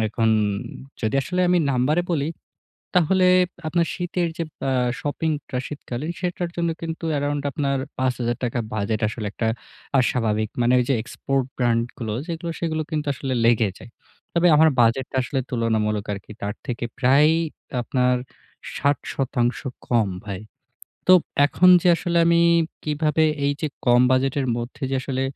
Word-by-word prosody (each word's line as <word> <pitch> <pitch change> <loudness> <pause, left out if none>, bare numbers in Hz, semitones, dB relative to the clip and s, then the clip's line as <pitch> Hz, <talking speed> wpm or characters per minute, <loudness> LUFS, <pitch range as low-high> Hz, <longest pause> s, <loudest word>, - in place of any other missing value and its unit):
এখন 115 +1 0 0.7
যদি 110 +2 -1
আসলে 180 +6 -2
আমি 180 - +4
নাম্বারে 140 +7 +2
বলি 145 -2 0 0.7
তাহলে 185 +2 +3 0.4
আপনার 170 +1 +1
শীতের 175 -1 -1
যে 170 - -1 0.2
বা 135 - -1 0.3
শপিংটা 145 -2 -2
শীতকালীন 145 +1 -5
সেটার 175 -1 -2
জন্য 170 -1 0
কিন্তু 165 0 -5
আরাউন্ড 145 0 -1
আপনার 140 -3 -1 0.2
৳৫০০০ 125 -1 -1
বাজেট 110 +1 -1
আসলে 110 0 -5
একটা 115 - -2 0.5
আ - - +6
অস্বাভাবিক। 110 -4 0
মানে 120 +1 +3
ওই - - +2
যে - - +4
export 135 +2 -2
brand 120 -2 +2
গুলো 110 -3 -3
সেগুলো 170 0 -4
সেগুলো 160 -2 -1
কিন্তু 150 -1 -2
আসলে 135 0 -3
লেগে 115 -3 +4
যায়। - - -13 0.4
তবে 170 +1 +4
আমার 160 +1 +6
বাজেটটা 120 +3 +2
আসলে 130 +2 -2
তুলনামূলক 110 -3 0
আরকি 100 +2 -9
তার 100 0 -2
থেকে 120 -3 -3
প্রায় 140 +4 +5 0.5
আপনার 125 0 +1 0.6
৬০% 135 -3 0 0.3
কম 115 -5 +2 0.2
ভাই। 100 -3 -5 0.7
তো - - +7 0.3
এখন 180 +5 +4
যে - - +1
আসলে 170 0 -1
আমি 170 0 +4 0.5
কিভাবে 155 +1 +1 0.2
এই 140 - +2
যে 155 - 0 0.2
কম 120 0 +5
বাজেটের 135 +1 +1
মধ্যে 120 +5 -7
যে - - +1
আসলে 130 0 -3
135 Hz, 145 wpm, -23 LUFS, 120-160 Hz, 0.7 s, তো